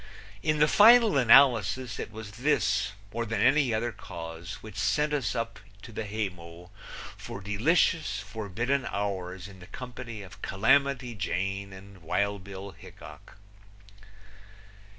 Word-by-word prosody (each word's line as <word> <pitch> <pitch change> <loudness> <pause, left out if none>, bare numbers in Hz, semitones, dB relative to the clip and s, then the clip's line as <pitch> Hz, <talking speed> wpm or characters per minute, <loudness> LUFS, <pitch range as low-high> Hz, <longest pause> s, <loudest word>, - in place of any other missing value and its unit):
In 155 -1 +1
the 150 0 +5
final 225 +2 +7
analysis 125 -2 +4
it - - -5
was 110 -1 -8
this 120 -3 +1 0.2
more 115 +1 -1
than 115 -2 -3
any 140 +3 +4
other 115 +2 -1
cause 85 -1 -8
which 110 -2 -10
sent 110 +9 +1
us 140 -5 -1
up 115 -1 -3 0.2
to - - -10
the 110 0 -5
haymow 90 -4 -6 0.4
for - - -8
delicious, 145 - +1
forbidden 120 +5 -2
hours 95 -2 -4
in 95 -2 -13
the 90 - -13
company 115 -1 -8
of 95 0 -13
Calamity 130 +4 +2
Jane 95 +1 -3
and 95 0 -13
Wild 100 +4 -1
Bill 100 0 -8
Hickok. 95 - -14
110 Hz, 130 wpm, -28 LUFS, 95-125 Hz, 0.4 s, final